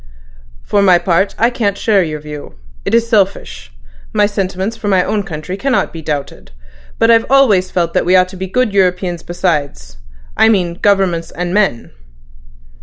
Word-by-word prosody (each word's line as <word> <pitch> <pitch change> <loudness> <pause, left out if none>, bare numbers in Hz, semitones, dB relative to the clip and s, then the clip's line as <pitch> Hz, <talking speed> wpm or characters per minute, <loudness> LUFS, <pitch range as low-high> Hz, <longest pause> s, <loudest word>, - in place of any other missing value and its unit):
"For 205 - +1
my 185 -3 +5
part, 175 +3 0
I 235 +2 +2
can't 205 -5 -1
share 210 -3 +2
your 155 -3 -3
view. 150 - -9 0.3
It 225 - +1
is 230 0 +2
selfish. 195 - -1 0.4
My - - +3
sentiments 195 +1 -3
for 225 -2 -6
my 190 -2 +3
own 210 +2 -1
country 165 -1 -6
cannot 270 +3 -1
be 165 - -7
doubted; 145 -2 -5 0.5
but 225 +1 +3
I've 230 0 +3
always 220 -9 +3
felt 170 -2 -1
that - - +1
we 180 - +3
ought 185 0 +4
to 190 - -11
be 190 +1 -5
good 240 +2 0
Europeans 180 -2 0
besides—I 65 - -2
mean 180 -5 0
governments 190 -5 +1
and 180 +1 -4
men." 195 - 0
185 Hz, 170 wpm, -15 LUFS, 165-205 Hz, 0.5 s, my